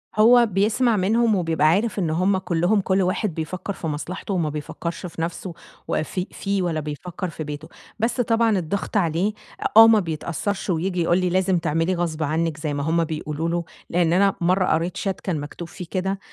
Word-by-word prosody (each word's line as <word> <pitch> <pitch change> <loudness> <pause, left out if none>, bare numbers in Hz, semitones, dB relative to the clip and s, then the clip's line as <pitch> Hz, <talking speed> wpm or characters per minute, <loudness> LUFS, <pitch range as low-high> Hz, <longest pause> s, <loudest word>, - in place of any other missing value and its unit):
هو 235 +3 +6
بيسمع 215 +4 +2
منهم 220 +3 +2
وبيبقى 165 -4 +2
عارف 205 +6 +2
إن 170 - 0
هُم 185 +5 +2
كلّهم 185 +3 +1
كُلّ 190 +1 +1
واحد 185 +1 0
بيفكّر 180 +5 -4
في 165 - -5
مصلحته 165 +6 -4
وما 170 -5 0
بيفكّرش 170 +4 -5
في 165 -1 -6
نَفْسه 175 +2 -4 0.3
وفي 180 +4 -2
فيه 200 -1 -2
ولا 165 -3 -1
بيفكّر 170 +5 -5
في 155 0 -6
بيته، 150 +1 -7 0.3
بس 240 +3 +1
طبعًا 225 -2 +2
الضغط 195 +5 -2
عليه 175 +3 +1 0.3
أ - - -6
آه 225 0 +11
ما 220 -2 +6
بيتأثّرش 175 +4 -3
وييجي 180 +1 0
يقول 170 +1 +3
لي 180 -1 +1
لازم 185 0 +2
تعملي 165 +2 0
غصب 160 -3 -2
عنِّك 160 +1 -1
زي 150 -1 -3
ما 145 - -2
هُم 165 +2 +2
بيقولوا 155 0 -3
له، 170 0 -1 0.3
لإن 170 -1 +2
أنا 195 +2 +3
مَرّة 185 +2 +3
قريت 170 +3 0
chat 195 -2 -3
كان 175 -5 -1
مكتوب 145 +4 -7
فيه 180 0 -8
كده، 190 +1 -1
180 Hz, 190 wpm, -23 LUFS, 160-195 Hz, 0.3 s, آه